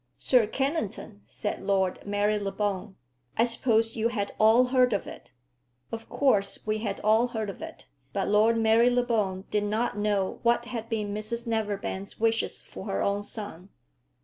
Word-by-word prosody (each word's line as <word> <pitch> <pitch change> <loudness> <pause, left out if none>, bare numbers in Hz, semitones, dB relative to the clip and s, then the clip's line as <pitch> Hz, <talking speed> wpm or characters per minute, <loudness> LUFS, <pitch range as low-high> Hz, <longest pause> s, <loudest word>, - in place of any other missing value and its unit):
"Sir 245 -5 +3
Kennington," 225 - -3
said 210 - -4
Lord 190 -2 0
Marylebone. 205 -1 -1 0.4
"I 225 - +5
supposed 230 -1 +2
you 225 0 +1
had 205 -4 -2
all 220 +3 +6
heard 250 -2 +4
of 200 - -1
it." - - -11 0.6
Of 225 0 -6
course 205 -8 +1
we 215 0 0
had 205 -3 -3
all 220 +3 +4
heard 220 -4 -3
of - - -14
it; 325 0 -9 0.3
but - - -1
Lord 215 +3 +4
Marylebone 225 -3 +2
did 210 0 +1
not 215 0 -1
know 205 -2 0
what 235 0 +2
had 230 -2 -5
been 210 -3 -2
Mrs 225 +3 -4
Neverbend's 205 -3 -3
wishes 225 0 0
for - - -9
her - - -1
own 200 0 0
son. 205 -3 -7
215 Hz, 155 wpm, -27 LUFS, 205-235 Hz, 0.6 s, all